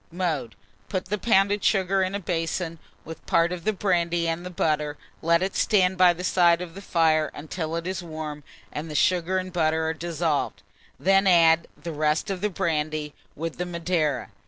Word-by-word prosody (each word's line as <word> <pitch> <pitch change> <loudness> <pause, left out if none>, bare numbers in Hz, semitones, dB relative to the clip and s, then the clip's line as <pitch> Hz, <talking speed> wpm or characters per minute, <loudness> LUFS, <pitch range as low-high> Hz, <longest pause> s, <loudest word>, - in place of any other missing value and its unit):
Mode. 155 - -2 0.3
Put 185 -1 -2
the 205 +2 -2
pounded 200 -1 +2
sugar 195 -1 +2
in 185 +1 -1
a - - -1
basin, 165 -1 -2 0.3
with 160 +1 -9
part 170 +1 +3
of 180 0 -5
the 215 - +3
brandy 175 -4 0
and 165 +1 -2
the 180 - -6
butter; 150 -4 -1 0.2
let 170 +2 +3
it 190 - -2
stand 190 -3 +3
by 180 -1 +6
the 175 +1 -6
side 175 -2 +4
of 180 -2 -7
the 195 - -9
fire 160 -4 +2
until 160 +2 -4
it 170 0 -3
is 185 +1 -3
warm 155 -3 -6 0.3
and 155 +2 -5
the 150 - -6
sugar 180 +3 +2
and 185 -1 -4
butter 160 -2 +1
are 160 - 0
dissolved; 165 -2 -2 0.4
then 195 +1 +3
add 165 -2 +5
the 170 -1 -6
rest 155 +5 0
of 185 -2 -4
the 210 - +1
brandy, 155 -5 -2 0.2
with 165 +2 -5
the 180 - -1
Madeira. 170 -5 -1
170 Hz, 190 wpm, -25 LUFS, 160-185 Hz, 0.4 s, by